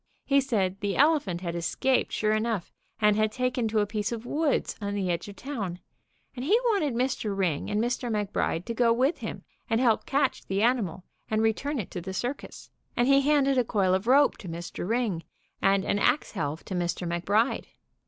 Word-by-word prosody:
He 275 Hz, 0 st, +4 dB
said 200 Hz, -8 st, 0 dB
the 205 Hz, -1 st, -1 dB
elephant 280 Hz, -, +3 dB
had 170 Hz, -2 st, -3 dB
es 170 Hz, -1 st, -2 dB
caped 265 Hz, -1 st, +2 dB
sure 215 Hz, 0 st, +1 dB
enough 215 Hz, -4 st, -1 dB, 0.3 s
and 210 Hz, -1 st, +4 dB
had 215 Hz, 0 st, +2 dB
taken 250 Hz, 0 st, 0 dB
to 215 Hz, -1 st, +1 dB
a -, -, +2 dB
piece 210 Hz, 0 st, -2 dB
of 230 Hz, 0 st, -5 dB
woods 295 Hz, +2 st, 0 dB
on 200 Hz, 0 st, -2 dB
the 190 Hz, -3 st, 0 dB
edge 170 Hz, -, -3 dB
of 200 Hz, -, -9 dB
town, 215 Hz, -11 st, -4 dB, 0.6 s
and 250 Hz, -, -5 dB
he 390 Hz, +11 st, +4 dB
wanted 305 Hz, -, 0 dB
Mr. 235 Hz, -5 st, -1 dB
Ring 175 Hz, -7 st, 0 dB
and 210 Hz, -, 0 dB
Mr. 240 Hz, +1 st, -1 dB
Mc 210 Hz, -2 st, -2 dB
Bride 165 Hz, +2 st, -1 dB
to 230 Hz, -, -3 dB
go 230 Hz, 0 st, +3 dB
with 260 Hz, +7 st, +2 dB
him -, -, -6 dB, 0.3 s
and 225 Hz, -1 st, +2 dB
help 235 Hz, -4 st, +2 dB
catch 275 Hz, -1 st, +1 dB
the 195 Hz, +2 st, 0 dB
animal 210 Hz, -8 st, +1 dB, 0.3 s
and 220 Hz, 0 st, +1 dB
re 220 Hz, 0 st, +4 dB
turn 285 Hz, +6 st, -3 dB
it 215 Hz, -, -4 dB
to 180 Hz, -, -5 dB
the 190 Hz, +2 st, -6 dB
cir 245 Hz, +6 st, -1 dB
cus, -, -, -13 dB, 0.3 s
and 240 Hz, -, +3 dB
he 275 Hz, 0 st, +5 dB
handed 275 Hz, -2 st, +3 dB
a -, -, +3 dB
coil 195 Hz, -5 st, +1 dB
of 190 Hz, +4 st, 0 dB
rope 280 Hz, +3 st, +5 dB
to 185 Hz, -, -8 dB
Mr. 170 Hz, +2 st, -5 dB
Ring 225 Hz, -8 st, 0 dB, 0.4 s
and 195 Hz, 0 st, +3 dB
an 205 Hz, -, +1 dB
ax 290 Hz, -, +2 dB
helve 160 Hz, -5 st, -3 dB
to -, -, -6 dB
Mr. 175 Hz, 0 st, -2 dB
McBride. 200 Hz, +8 st, +1 dB
220 Hz, 215 wpm, -27 LUFS, 190-255 Hz, 0.6 s, he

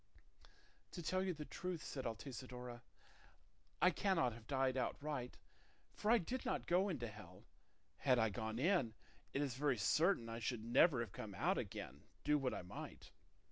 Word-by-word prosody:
"To 175 Hz, -, -5 dB
tell 185 Hz, +4 st, +1 dB
you 185 Hz, -2 st, 0 dB
the 150 Hz, -1 st, -6 dB
truth," 180 Hz, 0 st, -4 dB
said 130 Hz, -3 st, -3 dB
Altisidora, 125 Hz, +1 st, -6 dB, 1.0 s
"I 180 Hz, -, +8 dB
cannot 165 Hz, -, +2 dB
have 115 Hz, 0 st, -12 dB
died 135 Hz, -2 st, +2 dB
outright, 130 Hz, 0 st, -2 dB, 0.6 s
for 210 Hz, -, -1 dB
I 235 Hz, -, +8 dB
did 245 Hz, +6 st, -2 dB
not -, -, -1 dB
go 185 Hz, +3 st, +3 dB
into 130 Hz, -10 st, -2 dB
hell; 100 Hz, -4 st, -11 dB, 0.5 s
had 130 Hz, -3 st, +4 dB
I 110 Hz, -2 st, +4 dB
gone 110 Hz, +1 st, -3 dB
in, 135 Hz, -, +2 dB, 0.4 s
it 140 Hz, -, +1 dB
is 135 Hz, -3 st, -1 dB
very 135 Hz, 0 st, +1 dB
certain 150 Hz, -, +3 dB
I 115 Hz, 0 st, -4 dB
should 115 Hz, -1 st, -2 dB
never 125 Hz, +2 st, +5 dB
have 115 Hz, -, -4 dB
come 105 Hz, -2 st, -6 dB
out -, -, +2 dB
again, 70 Hz, +3 st, -5 dB, 0.2 s
do 150 Hz, 0 st, +4 dB
what 130 Hz, -2 st, 0 dB
I -, -, -4 dB
might. 90 Hz, -, -8 dB
130 Hz, 170 wpm, -40 LUFS, 115-165 Hz, 1.0 s, I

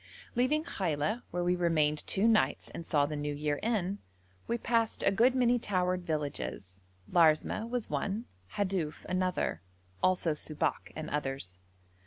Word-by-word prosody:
Leaving 260 Hz, +6 st, +2 dB
Khaila, 175 Hz, -, -1 dB
where 175 Hz, 0 st, -2 dB
we 180 Hz, +1 st, +2 dB
remained 155 Hz, -4 st, +1 dB
two 200 Hz, +3 st, +3 dB
nights 225 Hz, -2 st, +2 dB
and 165 Hz, -, -8 dB
saw 145 Hz, -2 st, +3 dB
the 150 Hz, +1 st, -4 dB
New 145 Hz, 0 st, -2 dB
Year 145 Hz, 0 st, -1 dB
in, 205 Hz, -3 st, 0 dB, 0.5 s
we 235 Hz, -, 0 dB
passed 230 Hz, -1 st, +1 dB
a -, -, +4 dB
good 240 Hz, +6 st, +4 dB
many 245 Hz, -1 st, +3 dB
towered 180 Hz, -4 st, 0 dB
villages: 140 Hz, -, -3 dB, 0.3 s
Larsmeh 170 Hz, +6 st, +3 dB
was 245 Hz, -2 st, -2 dB
one, 215 Hz, +4 st, -1 dB, 0.3 s
Hadouf 185 Hz, -6 st, -1 dB
another, 185 Hz, -, -1 dB, 0.4 s
also 180 Hz, -3 st, +2 dB
Subak 150 Hz, 0 st, -2 dB
and 155 Hz, -, -5 dB
others. 135 Hz, -11 st, -1 dB
180 Hz, 145 wpm, -31 LUFS, 150-215 Hz, 0.5 s, a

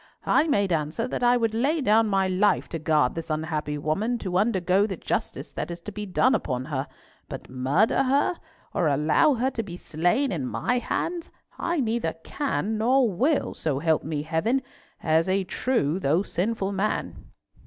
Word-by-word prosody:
"I 320 Hz, -, +3 dB
made 200 Hz, -, +2 dB
answer 155 Hz, +9 st, -1 dB
that -, -, -4 dB
I 245 Hz, 0 st, +4 dB
would 225 Hz, -2 st, 0 dB
lay 280 Hz, +8 st, +1 dB
down 225 Hz, -4 st, +3 dB
my 195 Hz, -2 st, +2 dB
life 185 Hz, +3 st, +2 dB
to 165 Hz, -, -4 dB
guard 150 Hz, -4 st, +2 dB
this 165 Hz, 0 st, -6 dB
unhappy 155 Hz, -1 st, -2 dB
woman 195 Hz, +12 st, -1 dB
to 185 Hz, -4 st, -1 dB
undergo 195 Hz, -2 st, +2 dB
the 190 Hz, -4 st, -5 dB
justice -, -, -3 dB
that -, -, -4 dB
is 170 Hz, 0 st, -6 dB
to 210 Hz, -, -7 dB
be 210 Hz, 0 st, -6 dB
done 255 Hz, +7 st, +3 dB
upon 130 Hz, -, -1 dB
her, 140 Hz, -1 st, -3 dB, 0.4 s
but -, -, -8 dB
murder 135 Hz, -, +2 dB
her, 275 Hz, +6 st, +2 dB, 0.4 s
or 170 Hz, -, +1 dB
allow 150 Hz, -, +3 dB
her 255 Hz, +3 st, 0 dB
to 230 Hz, -, -2 dB
be 180 Hz, -5 st, -8 dB
slain 180 Hz, -, 0 dB
in 145 Hz, -9 st, -2 dB
my 245 Hz, -, 0 dB
hands, 335 Hz, +6 st, -3 dB, 0.3 s
I 340 Hz, -3 st, 0 dB
neither 225 Hz, -8 st, -1 dB
can 220 Hz, -7 st, -2 dB
nor 245 Hz, -1 st, +3 dB
will, 275 Hz, -, +1 dB
so 150 Hz, -4 st, -2 dB
help 160 Hz, +2 st, +1 dB
me 150 Hz, -1 st, -3 dB
Heaven, 210 Hz, +12 st, 0 dB, 0.4 s
as 160 Hz, +2 st, +2 dB
a 195 Hz, +1 st, +2 dB
true 185 Hz, -, 0 dB
though 165 Hz, +3 st, +2 dB
sinful 200 Hz, +1 st, -2 dB
man." 200 Hz, +2 st, -2 dB
195 Hz, 180 wpm, -25 LUFS, 160-235 Hz, 0.4 s, I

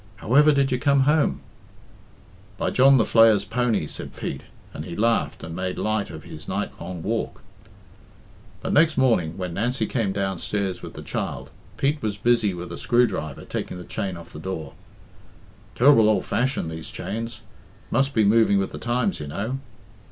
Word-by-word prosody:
However 145 Hz, +10 st, +4 dB
did 140 Hz, -2 st, +2 dB
you 125 Hz, -, +1 dB
come 140 Hz, 0 st, +3 dB
home?" 150 Hz, +2 st, +2 dB, 1.2 s
"By -, -, -1 dB
John 135 Hz, +1 st, +6 dB
the 115 Hz, -, +4 dB
Flayer's 110 Hz, -3 st, +5 dB
pony," 115 Hz, -4 st, 0 dB
said -, -, -7 dB
Pete; -, -, -5 dB, 0.3 s
and 75 Hz, -, -6 dB
he 85 Hz, 0 st, -7 dB
laughed 115 Hz, +3 st, 0 dB
and 80 Hz, 0 st, -6 dB
made 95 Hz, 0 st, -3 dB
light 110 Hz, -1 st, -1 dB
of -, -, -9 dB
his -, -, -10 dB
night -, -, -2 dB
long 90 Hz, -3 st, -6 dB
walk. 115 Hz, +2 st, -3 dB, 1.2 s
But -, -, -1 dB
next 155 Hz, 0 st, +4 dB
morning, 105 Hz, -11 st, +2 dB
when 90 Hz, -2 st, -4 dB
Nancy 120 Hz, +8 st, 0 dB
came 115 Hz, -6 st, -1 dB
downstairs 95 Hz, 0 st, -2 dB
with -, -, -8 dB
the -, -, -8 dB
child, -, -, -4 dB, 0.3 s
Pete 145 Hz, +2 st, 0 dB
was 105 Hz, -2 st, -2 dB
busy 115 Hz, -1 st, +2 dB
with 85 Hz, 0 st, -7 dB
a -, -, -6 dB
screwdriver 105 Hz, -, 0 dB
taking -, -, -4 dB
the 90 Hz, -, -8 dB
chain 95 Hz, -2 st, -4 dB
off 85 Hz, 0 st, -12 dB
the 75 Hz, -, -8 dB
door. 85 Hz, -2 st, -5 dB, 1.0 s
"Ter'ble 120 Hz, -4 st, +6 dB
ould 100 Hz, -4 st, +1 dB
fashioned, 125 Hz, -9 st, -1 dB
these 80 Hz, 0 st, -7 dB
chains 115 Hz, 0 st, -5 dB, 0.5 s
must 135 Hz, +3 st, +1 dB
be 110 Hz, -, +4 dB
moving 105 Hz, 0 st, +4 dB
with 95 Hz, -1 st, -1 dB
the -, -, -7 dB
times, 125 Hz, -, 0 dB
you -, -, -6 dB
know." 110 Hz, -, -3 dB
110 Hz, 175 wpm, -24 LUFS, 95-125 Hz, 1.2 s, John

